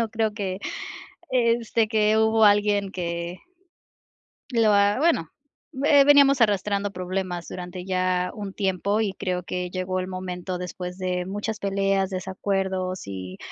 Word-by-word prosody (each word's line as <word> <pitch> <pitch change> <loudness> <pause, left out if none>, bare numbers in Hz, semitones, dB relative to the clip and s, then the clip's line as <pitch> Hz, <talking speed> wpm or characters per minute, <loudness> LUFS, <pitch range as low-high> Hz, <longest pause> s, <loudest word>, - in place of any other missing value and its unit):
No 230 - 0
creo 220 -1 0
que, 190 -3 -3 0.7
este, 235 -2 +2
que 215 -1 +2
hubo 220 0 +4
alguien 205 -1 +3
que 170 -1 -4 1.1
lo 225 -3 +3
ha 200 0 +4
bueno, 305 - +2 0.5
eh, 285 -1 +6
veníamos 280 -2 +6
arrastrando 205 -1 +1
problemas 180 -1 -4
durante 180 0 -7
ya 185 -1 0
un 200 -2 -6
tiempo, 200 +2 0
y 200 -3 -1
creo 185 -2 -2
que 180 0 -4
llegó 185 0 -2
el 185 - -3
momento 185 -1 -5
después 180 0 -6
de 180 -1 -1
muchas 205 +3 -4
peleas, 195 -1 0
desacuerdos 190 0 -2
y, 95 -1 -7
195 Hz, 140 wpm, -24 LUFS, 185-210 Hz, 1.1 s, eh